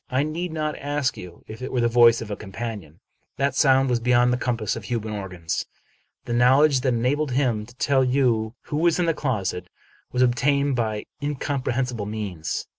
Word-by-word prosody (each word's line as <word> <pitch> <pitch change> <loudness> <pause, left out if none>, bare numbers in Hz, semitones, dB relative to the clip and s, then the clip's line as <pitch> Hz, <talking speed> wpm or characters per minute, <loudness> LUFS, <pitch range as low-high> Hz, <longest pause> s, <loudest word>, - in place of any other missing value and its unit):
I 135 +1 +1
need 165 +3 -3
not 155 -1 -2
ask 145 -1 -1
you 90 -1 -11
if 110 +2 -9
it 130 - -5
were 125 - 0
the 120 - +3
voice 115 0 +5
of 110 -2 -6
a - - -2
companion. 105 -5 -7 0.4
That 140 0 +1
sound 135 -1 +4
was 125 -2 +1
beyond 125 +1 +3
the - - +1
compass 120 -4 -1
of 115 -3 -7
human 110 -3 -3
organs. 90 -5 -4 0.6
The 120 - -3
knowledge 135 +4 +5
that 125 -1 +1
enabled 135 +4 0
him 120 -6 0
to 125 - -16
tell 135 0 +2
you 125 -4 +1
who 145 - -4
was 170 +1 +3
in 175 - +1
the 165 - +2
closet 95 - -2 0.4
was 125 - +2
obtained 140 +3 +2
by 110 -3 -2 0.2
incomprehensible 130 -5 -2
means. 100 -7 -4
125 Hz, 190 wpm, -24 LUFS, 110-140 Hz, 0.6 s, voice